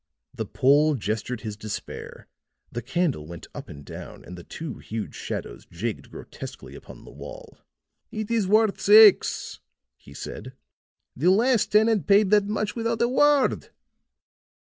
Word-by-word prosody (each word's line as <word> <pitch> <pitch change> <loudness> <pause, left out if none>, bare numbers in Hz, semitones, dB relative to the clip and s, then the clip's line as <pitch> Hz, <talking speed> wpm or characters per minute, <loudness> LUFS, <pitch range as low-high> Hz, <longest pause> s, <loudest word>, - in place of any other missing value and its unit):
The - - -5
Pole 145 +3 +3
gestured 110 +1 -3
his 110 -3 -5
despair; 110 0 -8 0.4
the 120 - -4
candle 155 - -1
went 85 -1 -9
up - - -9
and 70 -1 -11
down - - -10
and 90 - -9
the 85 - -10
two 155 - -7
huge 110 0 -6
shadows - - -6
jigged 105 +6 -5
grotesquely - - -10
upon - - -12
the - - -12
wall. - - -11 0.5
"It 215 +1 -5
is 225 -5 +1
worth 215 0 +3
six," 210 -1 +6 0.4
he 70 - -16
said. 130 - -8 0.6
"The 160 +8 +2
last 230 +4 +3
tenant 215 -4 +3
paid 200 0 +4
that 205 -1 +4
much 210 0 -2
without 230 -1 -1
a 235 - +3
word." 285 +2 +2
185 Hz, 145 wpm, -25 LUFS, -, 0.6 s, six